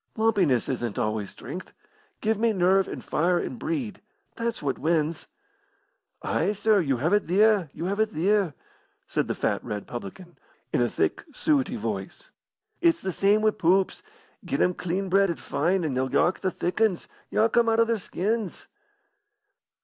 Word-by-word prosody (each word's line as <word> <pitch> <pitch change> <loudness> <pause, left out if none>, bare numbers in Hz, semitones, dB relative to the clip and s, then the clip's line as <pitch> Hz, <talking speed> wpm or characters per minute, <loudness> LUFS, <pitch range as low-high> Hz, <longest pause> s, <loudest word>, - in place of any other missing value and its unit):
"Lumpiness 200 - +2
isn't 120 -5 -3
always 110 -2 -1
strength. 160 +9 -8 0.5
Give 220 -1 +1
me 230 0 +2
nerve 190 0 +3
and - - -7
fire 175 +3 +1
and 240 - -4
breed. 285 -10 -3 0.3
That's 230 -5 -3
what 135 -2 -1
wins." 160 0 0 1.0
"Ay, 210 - 0
sir, 210 0 +3
you 140 -7 +1
have 160 +10 +1
it 205 - +2
theer 200 -1 +4
you 165 - -5
have 200 +3 -2
it 220 0 +3
theer!" 195 -2 +1 0.5
said - - -1
the - - -2
fat, - - -1
red 105 -1 -4
faced - - -20
publican, 145 - -8 0.3
in - - +2
a 120 - +2
thick - - -1
suety 290 0 +1
voice. - - -5 0.5
"It's 335 -1 +4
the 190 - -3
same 205 +4 +2
wi' 215 - +5
poops. 185 +1 +1 0.4
Get - - -2
'em 180 - +3
clean 185 +3 -2
bred 195 +1 +3
an' 170 - -1
fine, 175 +5 0
an' 145 - -1
they'll 130 +1 0
yark 175 +3 +2
the 190 - 0
thick 180 +3 -3
'uns 215 -6 +2 0.2
yark 220 +1 +2
'em 235 -1 +4
out 225 0 +2
o' 230 - +6
their 230 -1 0
skins." 205 +2 -3
190 Hz, 175 wpm, -26 LUFS, 160-215 Hz, 1.0 s, o